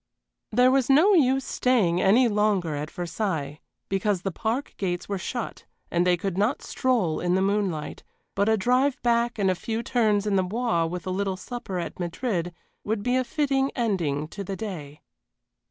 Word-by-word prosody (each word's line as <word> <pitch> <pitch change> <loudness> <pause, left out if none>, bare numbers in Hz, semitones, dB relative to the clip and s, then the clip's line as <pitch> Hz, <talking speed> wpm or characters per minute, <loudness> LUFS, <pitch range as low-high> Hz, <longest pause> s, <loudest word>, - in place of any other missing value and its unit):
There 250 +3 +5
was 265 -1 +2
no 320 +10 +6
use 270 -6 +3
staying 195 -9 +2
any 235 +7 +5
longer 205 -6 +1
at 150 +1 -4
Versailles, 165 -5 -3 0.3
because 195 -1 0
the 195 - -1
park 230 +9 -2
gates 175 -3 -2
were 200 -1 -2
shut 240 +4 -5 0.3
and 175 +1 +2
they 180 -1 +4
could 195 0 -3
not 215 +7 +1
stroll 230 - 0
in 180 0 +1
the - - +2
moonlight, 195 -7 -1 0.3
but 200 +2 +1
a 220 - +3
drive 250 +6 +2
back 235 0 +2
and 195 -3 +2
a - - +2
few 225 +5 -4
turns 215 -4 +1
in 205 -2 +1
the - - +4
Bois 200 -4 0
with 180 +1 -5
a 185 - -2
little 190 0 -1
supper 220 -1 -6
at 175 - -5
Madrid 175 0 -2 0.3
would 210 -1 -2
be 250 +2 +1
a 255 - +2
fitting 270 0 0
ending 170 - -1
to 200 - -6
the 195 +1 -4
day. 160 -9 -7
200 Hz, 185 wpm, -25 LUFS, 180-240 Hz, 0.3 s, no